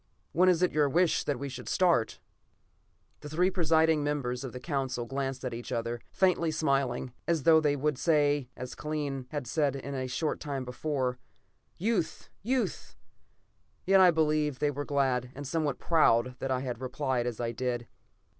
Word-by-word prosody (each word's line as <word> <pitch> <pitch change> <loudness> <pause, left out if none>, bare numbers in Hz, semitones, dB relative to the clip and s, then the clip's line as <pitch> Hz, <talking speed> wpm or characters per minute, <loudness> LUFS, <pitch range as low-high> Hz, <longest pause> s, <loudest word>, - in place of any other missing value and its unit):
When 185 +3 +4
is 180 -1 +3
it 180 - +3
your 150 -2 +2
wish 175 +3 +2
that 145 - -1
we 140 +3 -4
should 125 -2 -7
start?" 170 -11 +2 1.0
The 150 - -9
three 180 +5 +2
presiding 160 -3 +3
members 135 -4 -2
of 130 - -5
the 125 - -7
Council 135 -5 -2
glanced 135 0 -3
at 125 - -3
each 120 +2 -7
other, 115 -1 -2
faintly 180 -3 +2
smiling, 135 -5 0
as 165 -4 +1
though 160 +1 +6
they 145 -2 +2
would 145 -1 -1
say, 145 -5 +2
as 125 -1 -6
Kellen 145 -4 -4
had 145 -4 -4
said 140 +2 0
a 135 -1 -4
short 140 +5 -2
time 140 -3 -4
before: 125 -1 -2 0.6
"Youth! 195 -4 -1
Youth!" 250 +4 -2 0.9
Yet 195 0 +6
I 185 - +8
believe 155 -3 +1
they 145 +1 +1
were 145 +1 -4
glad 130 -3 0
and 145 +1 -7
somewhat 145 -2 -1
proud 125 -7 +3
that 135 - -3
I 130 -1 0
had 125 -2 -4
replied 130 -1 -1
as 120 -3 -4
I 120 -1 -1
did. 120 0 -3
140 Hz, 175 wpm, -29 LUFS, 125-155 Hz, 1.0 s, I